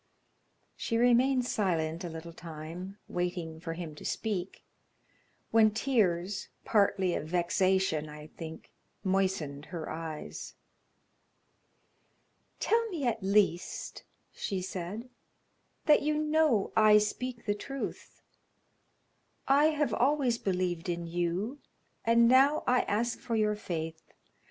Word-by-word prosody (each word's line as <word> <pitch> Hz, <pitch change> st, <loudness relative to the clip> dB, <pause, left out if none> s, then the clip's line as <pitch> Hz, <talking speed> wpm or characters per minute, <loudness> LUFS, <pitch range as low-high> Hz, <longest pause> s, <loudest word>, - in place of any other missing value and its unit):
She 230 Hz, -, -1 dB
remained 245 Hz, +2 st, +4 dB
silent 170 Hz, -6 st, 0 dB
a 175 Hz, -, -4 dB
little 165 Hz, +1 st, -8 dB
time, 165 Hz, +4 st, -8 dB
waiting 175 Hz, -2 st, -3 dB
for 165 Hz, 0 st, -4 dB
him 165 Hz, -2 st, -6 dB
to 150 Hz, -, -12 dB
speak, 200 Hz, -4 st, -3 dB, 0.9 s
when 225 Hz, -1 st, +6 dB
tears, 205 Hz, -6 st, 0 dB, 0.2 s
partly 195 Hz, -4 st, +2 dB
of 155 Hz, -, -3 dB
vexation, 180 Hz, -2 st, +1 dB
I 150 Hz, 0 st, -9 dB
think, 160 Hz, +1 st, -9 dB, 0.3 s
moistened 185 Hz, -7 st, 0 dB
her 165 Hz, -2 st, -6 dB
eyes. 160 Hz, -1 st, -6 dB, 2.0 s
"Tell 460 Hz, 0 st, +2 dB
me 325 Hz, -9 st, -3 dB
at 230 Hz, -2 st, 0 dB
least," 195 Hz, -2 st, 0 dB, 0.3 s
she 195 Hz, -3 st, -3 dB
said, 185 Hz, +5 st, -5 dB, 0.8 s
"that 300 Hz, -2 st, +6 dB
you 300 Hz, +1 st, +1 dB
know 305 Hz, -8 st, +2 dB
I 215 Hz, -1 st, +7 dB
speak 235 Hz, +3 st, -2 dB
the 205 Hz, -, +2 dB
truth. 270 Hz, +6 st, -6 dB, 1.2 s
I 280 Hz, +2 st, +5 dB
have 300 Hz, -2 st, +2 dB
always 255 Hz, -2 st, +2 dB
believed 180 Hz, -2 st, -1 dB
in 170 Hz, 0 st, -2 dB
you, 175 Hz, +10 st, -2 dB, 0.4 s
and 230 Hz, 0 st, +5 dB
now 270 Hz, +4 st, +5 dB
I 250 Hz, 0 st, +4 dB
ask 235 Hz, +4 st, 0 dB
for 245 Hz, -3 st, -3 dB
your 210 Hz, -1 st, +2 dB
faith. 165 Hz, -5 st, -4 dB
195 Hz, 115 wpm, -30 LUFS, 170-240 Hz, 2.0 s, I